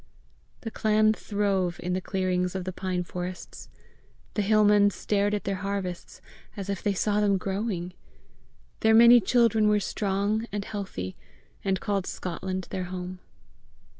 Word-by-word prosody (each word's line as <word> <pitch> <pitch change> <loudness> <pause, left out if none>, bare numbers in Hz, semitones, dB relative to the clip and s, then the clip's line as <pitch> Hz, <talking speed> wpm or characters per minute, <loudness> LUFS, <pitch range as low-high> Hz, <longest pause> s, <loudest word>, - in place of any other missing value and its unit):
The 225 - -5
clan 215 0 +3
throve 200 -5 -1
in 180 +1 -2
the 185 - -1
clearings 185 -1 -1
of 190 - -2
the 185 +1 -5
pine 185 -1 -2
forests. 180 +1 -7 0.6
The 210 - 0
hill 215 +1 +4
men 205 -1 +5
stared 205 +1 0
at 205 - -4
their 195 -1 -2
harvests 190 -2 -5 0.4
as 200 0 -3
if 195 - -4
they 205 -1 0
saw 210 +2 +1
them 200 -2 +3
growing. 190 -2 -3 0.9
Their 220 0 +4
many 235 +1 +8
children 220 0 +3
were 210 0 +4
strong 205 +3 -1
and 205 0 -3
healthy, 185 - -5 0.5
and 190 -1 0
called 200 -2 -1
Scotland 185 +1 -4
their 185 -1 -3
home. 180 0 -6
195 Hz, 150 wpm, -27 LUFS, 185-210 Hz, 0.9 s, many